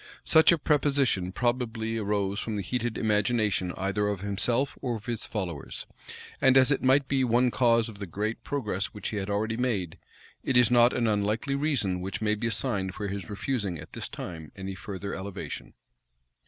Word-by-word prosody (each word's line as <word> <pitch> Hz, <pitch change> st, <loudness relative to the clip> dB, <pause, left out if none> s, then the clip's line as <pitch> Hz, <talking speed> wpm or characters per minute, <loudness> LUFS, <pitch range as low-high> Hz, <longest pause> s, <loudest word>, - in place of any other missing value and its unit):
Such 160 Hz, +2 st, +6 dB
a 170 Hz, -, +4 dB
prepossession 140 Hz, -, +1 dB
probably 115 Hz, -1 st, -1 dB
arose 100 Hz, -1 st, -1 dB
from 110 Hz, -, -3 dB
the 100 Hz, -, -2 dB
heated 120 Hz, +1 st, -2 dB
imagination 105 Hz, -3 st, +1 dB
either 100 Hz, +2 st, 0 dB
of 100 Hz, -2 st, -2 dB
himself 115 Hz, +7 st, +1 dB
or 125 Hz, -3 st, -1 dB
of 110 Hz, -1 st, -8 dB
his 120 Hz, -3 st, -2 dB
followers; 90 Hz, -9 st, -5 dB, 0.6 s
and 130 Hz, -1 st, +6 dB
as 130 Hz, +1 st, +6 dB
it 135 Hz, -, +2 dB
might 135 Hz, +1 st, +4 dB
be 135 Hz, -1 st, +1 dB
one 125 Hz, +1 st, +3 dB
cause 115 Hz, -2 st, +3 dB
of 105 Hz, -3 st, -10 dB
the 100 Hz, -, -5 dB
great 105 Hz, +6 st, -3 dB
progress 105 Hz, -9 st, -2 dB
which 105 Hz, -, -4 dB
he 105 Hz, -, -4 dB
had 100 Hz, 0 st, -3 dB
already 110 Hz, +2 st, -1 dB
made, 105 Hz, -10 st, -1 dB, 0.4 s
it 130 Hz, -, +2 dB
is 125 Hz, 0 st, +5 dB
not 120 Hz, 0 st, +6 dB
an 120 Hz, -, 0 dB
unlikely 110 Hz, +5 st, 0 dB
reason 135 Hz, -11 st, 0 dB
which 95 Hz, +1 st, -4 dB
may 105 Hz, -1 st, +1 dB
be 110 Hz, +3 st, -2 dB
assigned 100 Hz, -4 st, +1 dB
for 105 Hz, -1 st, -4 dB
his 100 Hz, -3 st, -5 dB
refusing 105 Hz, -4 st, -2 dB
at 75 Hz, -, -11 dB
this -, -, -5 dB
time 80 Hz, -3 st, -7 dB
any 95 Hz, -1 st, -5 dB
further 100 Hz, +2 st, -6 dB
elevation. 100 Hz, 0 st, -6 dB
110 Hz, 185 wpm, -28 LUFS, 100-125 Hz, 0.6 s, Such